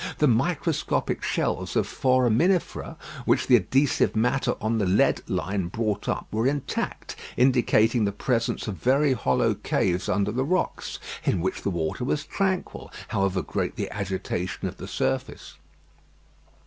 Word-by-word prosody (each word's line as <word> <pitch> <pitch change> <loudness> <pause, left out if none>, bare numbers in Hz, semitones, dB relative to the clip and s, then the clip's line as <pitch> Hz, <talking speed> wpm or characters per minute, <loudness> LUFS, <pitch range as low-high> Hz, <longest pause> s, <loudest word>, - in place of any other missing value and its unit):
The 150 - +3
microscopic 155 +6 0
shells - - -1
of - - +2
foraminifera 130 - +1 0.3
which - - +2
the 125 - +6
adhesive 130 +7 +2
matter 125 +5 +1
on 110 +1 0
the 105 - +1
lead 95 +3 +3
line 95 -2 -1
brought 105 +1 -2
up - - -1
were 110 +3 +1
intact, 145 0 -3 0.2
indicating 120 -2 +3
the 100 - 0
presence 115 +3 -1
of 100 -4 -4
very 135 - +3
hollow 65 - +1
caves 90 0 -1
under 100 0 +1
the 130 +4 0
rocks, 180 +7 -1 0.3
in 95 - +1
which 90 +3 -2
the - - -1
water 85 +5 -2
was 145 +4 -1
tranquil, 190 -2 -2 0.2
however 95 -1 0
great - - -2
the - - -4
agitation 95 -2 -3
of - - -7
the - - -7
surface. - - -3
115 Hz, 145 wpm, -25 LUFS, 100-135 Hz, 0.3 s, the